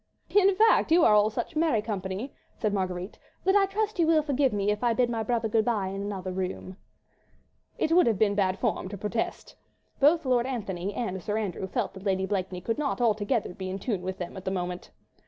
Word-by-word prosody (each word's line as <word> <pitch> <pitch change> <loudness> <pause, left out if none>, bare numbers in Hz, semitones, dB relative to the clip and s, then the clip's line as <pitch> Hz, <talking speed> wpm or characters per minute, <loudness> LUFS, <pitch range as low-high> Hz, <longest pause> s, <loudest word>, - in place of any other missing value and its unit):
"In 395 -1 +5
fact 440 -5 +4
you 335 0 +6
are 215 - +6
all 210 0 +5
such 220 - -4
merry 310 -9 +2
company," 200 +3 -4 0.2
said 215 -2 -1
Marguerite, 185 -1 -3 0.2
"that 385 +1 +3
I 395 -1 +5
trust 425 0 -2
you 330 - +4
will 320 -2 +4
forgive 280 -2 +1
me 205 0 0
if 210 +3 -3
I 240 -1 +3
bid 240 0 +1
my 225 -1 -1
brother 230 +1 0
good 220 0 +2
bye 210 -6 0
in 195 +1 -5
another 195 -2 -4
room." 185 0 -4 1.0
It 315 - 0
would 350 -2 +5
have 225 -4 +2
been 205 0 +3
bad 195 -2 +1
form 185 - -1
to 200 - -6
protest. 210 +4 -3 0.4
Both 310 +3 +4
Lord 250 -1 +2
Antony 200 -7 -3
and 190 -6 -3
Sir 210 +4 -2
Andrew 195 -3 -3
felt - - -2
that 190 0 -11
Lady 190 -2 0
Blakeney 185 -2 -3
could 230 +8 -2
not 285 -3 -1
altogether 220 -2 +1
be 185 +1 -6
in 190 - -3
tune 200 -2 -2
with 185 +1 -4
them 175 -2 -6
at 190 - -8
that 190 - -2
moment. 180 -1 -4
210 Hz, 220 wpm, -27 LUFS, 190-255 Hz, 1.0 s, you